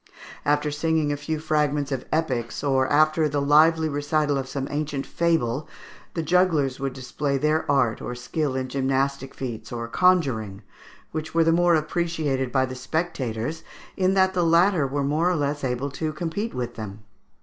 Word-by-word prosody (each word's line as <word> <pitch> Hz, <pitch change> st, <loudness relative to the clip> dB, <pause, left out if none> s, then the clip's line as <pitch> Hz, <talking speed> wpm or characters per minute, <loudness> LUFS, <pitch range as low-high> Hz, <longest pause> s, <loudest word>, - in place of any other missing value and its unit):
After 145 Hz, +1 st, +2 dB
singing 155 Hz, 0 st, 0 dB
a -, -, 0 dB
few 145 Hz, +2 st, -3 dB
fragments 150 Hz, -2 st, 0 dB
of 130 Hz, -2 st, -3 dB
epics, 130 Hz, -7 st, -1 dB
or 135 Hz, -2 st, +2 dB
after 155 Hz, +2 st, +3 dB
the 145 Hz, 0 st, -1 dB
lively 155 Hz, +3 st, +4 dB
recital 145 Hz, 0 st, 0 dB
of 135 Hz, -1 st, -3 dB
some 135 Hz, -1 st, -3 dB
ancient 145 Hz, -2 st, -2 dB
fable, 155 Hz, -4 st, 0 dB, 0.5 s
the 165 Hz, -, -1 dB
jugglers 160 Hz, -6 st, +2 dB
would 135 Hz, -1 st, -2 dB
display 140 Hz, +2 st, -2 dB
their 155 Hz, +3 st, 0 dB
art 125 Hz, -6 st, +2 dB
or 125 Hz, -, -5 dB
skill 135 Hz, +3 st, -2 dB
in 130 Hz, 0 st, -2 dB
gymnastic 135 Hz, 0 st, -1 dB
feats 120 Hz, -5 st, -6 dB
or 115 Hz, -1 st, -4 dB
conjuring, 120 Hz, -, +1 dB, 0.5 s
which 160 Hz, +1 st, -5 dB
were 165 Hz, -, +5 dB
the 165 Hz, -, +3 dB
more 175 Hz, 0 st, +4 dB
appreciated 155 Hz, -5 st, -1 dB
by 130 Hz, 0 st, +2 dB
the 130 Hz, -, -7 dB
spectators, 135 Hz, -1 st, -3 dB, 0.3 s
in 190 Hz, 0 st, +2 dB
that 190 Hz, 0 st, +3 dB
the 180 Hz, -2 st, +1 dB
latter 170 Hz, -2 st, +4 dB
were 140 Hz, +1 st, -1 dB
more 155 Hz, +5 st, +1 dB
or 180 Hz, -, +1 dB
less 145 Hz, -1 st, -1 dB
able 130 Hz, +2 st, -2 dB
to 155 Hz, +3 st, -3 dB
compete 175 Hz, +8 st, -3 dB
with 120 Hz, -1 st, -3 dB
them. 105 Hz, -2 st, -8 dB
145 Hz, 170 wpm, -24 LUFS, 130-160 Hz, 0.5 s, were